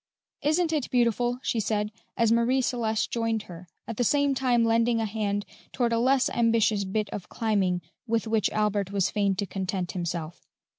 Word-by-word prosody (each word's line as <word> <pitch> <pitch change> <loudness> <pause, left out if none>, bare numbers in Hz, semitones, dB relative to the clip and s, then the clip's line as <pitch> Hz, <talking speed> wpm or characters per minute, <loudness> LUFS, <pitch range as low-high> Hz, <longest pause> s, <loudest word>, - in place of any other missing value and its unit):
"Isn't 320 +2 +1
it 295 -5 -1
beautiful!" 240 0 +1
she 230 - 0
said, 210 0 -1 0.3
as 230 -1 +3
Marie 235 +3 +3
Celeste 225 -4 -1
joined 225 -2 -1
her, 175 -1 -11 0.2
at 230 - -5
the 245 - +2
same 285 +3 +2
time 245 -3 +2
lending 230 +1 +2
a 225 - 0
hand 205 -1 -2 0.3
toward 240 -2 0
a 230 - +2
less 260 +2 +3
ambitious 225 -3 +2
bit 210 +2 -1
of 190 -4 -6
climbing 195 -6 0 0.2
with 230 0 0
which 220 -2 +1
Albert 205 -2 0
was 195 -2 +1
fain 200 -2 +1
to 200 - -2
content 190 -1 -3
himself. 170 -2 -5
220 Hz, 180 wpm, -27 LUFS, 200-240 Hz, 0.3 s, as